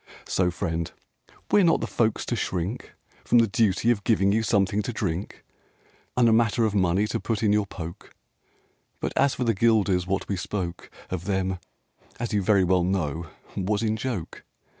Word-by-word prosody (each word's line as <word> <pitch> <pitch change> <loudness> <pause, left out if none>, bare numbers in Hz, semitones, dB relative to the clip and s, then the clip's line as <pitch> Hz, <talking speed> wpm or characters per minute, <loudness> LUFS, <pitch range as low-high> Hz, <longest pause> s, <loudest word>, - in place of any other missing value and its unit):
So, 90 -1 +1
friend, 85 -2 -3 0.6
we're 205 - +6
not 165 -2 +4
the - - -2
folks 110 -2 0
to 120 - -1
shrink 95 +1 -2
RAINBOW - - -21 0.2
GOLD - - -28
From 120 - +5
the 115 -1 +5
duty 110 +2 +2
of 105 -4 -1
giving 100 -3 +3
you 110 +2 +2
something 100 -2 +1
to 115 - -4
drink, 95 -4 -4 0.7
And 120 -2 +5
a 115 - +5
matter 115 0 +3
of 110 - 0
money 95 0 +2
to - - -2
put 115 -2 -2
in 105 -1 +4
your 105 -1 +1
poke; 85 -3 -8 0.9
But - - -3
as 140 -1 +3
for 125 - -2
the 115 -2 +2
guilders, 100 -4 +2
what 95 +1 -1
we 100 - -2
spoke 90 -2 -4 0.2
Of 90 -1 -3
them, 95 -2 -1 0.6
as 120 -1 -3
you 105 - +2
very 100 0 +3
well 90 0 +3
know, 85 -3 -1 0.3
was 100 +3 0
in 110 -1 +1
joke. 110 -7 -5
100 Hz, 190 wpm, -25 LUFS, 90-115 Hz, 0.9 s, we're